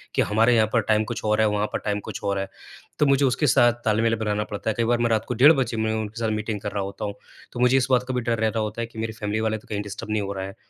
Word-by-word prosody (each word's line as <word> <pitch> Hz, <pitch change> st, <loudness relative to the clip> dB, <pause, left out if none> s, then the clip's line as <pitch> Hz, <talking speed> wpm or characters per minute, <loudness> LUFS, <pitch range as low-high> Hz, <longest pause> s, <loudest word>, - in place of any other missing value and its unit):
कि -, -, +3 dB
हमारे 115 Hz, +3 st, +3 dB
यहाँ 110 Hz, -1 st, +4 dB
पर 115 Hz, -, +4 dB
टाइम 110 Hz, 0 st, +3 dB
कुछ 120 Hz, -, -5 dB
और 105 Hz, 0 st, +2 dB
है 110 Hz, -, +4 dB
वहाँ 105 Hz, 0 st, 0 dB
पर -, -, -1 dB
टाइम 105 Hz, 0 st, 0 dB
कुछ -, -, -7 dB
और 100 Hz, -1 st, 0 dB
है। 95 Hz, -, -3 dB, 0.5 s
तो 150 Hz, -, +4 dB
मुझे 140 Hz, 0 st, +3 dB
उसके 135 Hz, +4 st, +1 dB
साथ 120 Hz, -1 st, +5 dB
तालमेल 115 Hz, +1 st, +2 dB
बनाना 105 Hz, -1 st, -1 dB
पड़ता 105 Hz, +1 st, -4 dB
है। -, -, +1 dB
कई 115 Hz, -, +2 dB
बार 120 Hz, +1 st, +2 dB
मैं 120 Hz, 0 st, +1 dB
रात 110 Hz, -1 st, +1 dB
को -, -, -2 dB
डेढ़ 135 Hz, +7 st, +7 dB
बजे 125 Hz, -5 st, -1 dB
में 110 Hz, 0 st, 0 dB
उनके 110 Hz, +1 st, -4 dB
साथ 110 Hz, -, 0 dB
मीटिंग 105 Hz, -1 st, -3 dB
कर 105 Hz, -, -4 dB
रहा 100 Hz, -1 st, -2 dB
होता 100 Hz, +2 st, -5 dB
हूँ। 100 Hz, -, -4 dB, 0.4 s
तो -, -, -7 dB
मुझे 125 Hz, +1 st, +4 dB
इस 125 Hz, -2 st, +1 dB
बात 125 Hz, -1 st, +4 dB
का 130 Hz, -, -2 dB
भी 125 Hz, -, 0 dB
डर 115 Hz, 0 st, -1 dB
रह 110 Hz, -, +2 dB
रहा 110 Hz, +1 st, -1 dB
होता 105 Hz, +2 st, -4 dB
है 115 Hz, -, -3 dB
कि 115 Hz, -1 st, -11 dB
मेरी 110 Hz, 0 st, -3 dB
फैमिली 105 Hz, 0 st, -3 dB
वाले 110 Hz, 0 st, 0 dB
तो 110 Hz, -, -17 dB
कहीं 105 Hz, -1 st, -2 dB
डिस्टर्ब 105 Hz, +1 st, -7 dB
नहीं 110 Hz, -1 st, +1 dB
हो 100 Hz, 0 st, -4 dB
रहे 95 Hz, -1 st, -4 dB
हैं। 95 Hz, -, -9 dB
110 Hz, 330 wpm, -24 LUFS, 105-120 Hz, 0.5 s, डेढ़